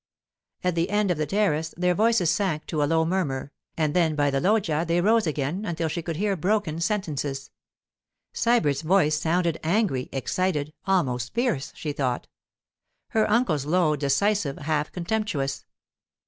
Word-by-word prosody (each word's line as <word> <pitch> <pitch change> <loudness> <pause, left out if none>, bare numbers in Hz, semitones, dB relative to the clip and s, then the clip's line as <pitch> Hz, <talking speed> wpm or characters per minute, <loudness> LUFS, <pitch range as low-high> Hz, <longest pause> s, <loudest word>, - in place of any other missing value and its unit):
At 180 -1 +1
the 170 +3 0
end 205 -1 +1
of 165 - -1
the 155 - 0
terrace 165 -5 0
their 180 0 +2
voices 215 -4 +3
sank 170 -4 -1
to 155 -3 -2
a - - +3
low 160 +2 +2
murmur, 150 -7 -2 0.3
and 155 -2 +1
then 165 -3 +2
by 145 -1 +2
the 135 - +1
loggia 185 -6 +2
they 170 +1 +1
rose 215 +2 +3
again 150 +6 -2
until 170 -4 -2
she 170 +2 -3
could 165 0 -4
hear 200 +3 0
broken 185 -2 0
sentences. 150 -9 -2 0.8
Sybert's 155 - +2
voice 155 -3 +3
sounded 170 0 0
angry, 165 - 0
excited, 150 +2 -1
almost 125 -11 0
fierce, 235 - 0
she 150 -2 -4
thought; 130 -4 -1 0.8
her 220 -4 +1
uncle's, 175 - +1
low, 165 -2 +3
decisive, 145 +3 +1
half 150 0 -1
contemptuous. 175 -7 -2
165 Hz, 155 wpm, -25 LUFS, 150-195 Hz, 0.8 s, voices